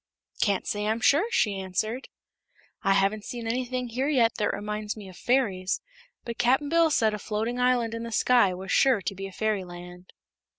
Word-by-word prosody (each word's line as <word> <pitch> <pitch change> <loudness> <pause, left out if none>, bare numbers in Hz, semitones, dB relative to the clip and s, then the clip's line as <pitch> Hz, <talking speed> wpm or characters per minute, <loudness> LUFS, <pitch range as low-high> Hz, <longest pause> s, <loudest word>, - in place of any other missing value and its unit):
"Can't 200 -3 +1
say, 210 -2 -2
I'm 220 +2 0
sure," 295 - +3
she 205 - +1
answered. 215 +7 -3 0.7
"I 195 - +3
haven't 200 +2 +1
seen 240 0 -6
anything 250 +1 -2
here 255 +4 -1
yet 240 -6 +3
that 210 - +1
reminds 210 +1 -4
me 205 -2 -9
of 185 - -13
fairies; 200 -8 0 0.5
but 235 0 -6
Cap'n 265 +4 +2
Bill 335 0 +4
said 220 -7 +2
a 210 - -4
floating 220 +5 -2
island 250 -2 +2
in 230 - -4
the 230 0 -6
sky 235 -3 +4
was 190 +2 -6
sure 255 -8 +4
to 185 - -2
be 195 0 -6
a - - -11
fairyland." 180 -3 -4
220 Hz, 185 wpm, -27 LUFS, 195-245 Hz, 0.7 s, Bill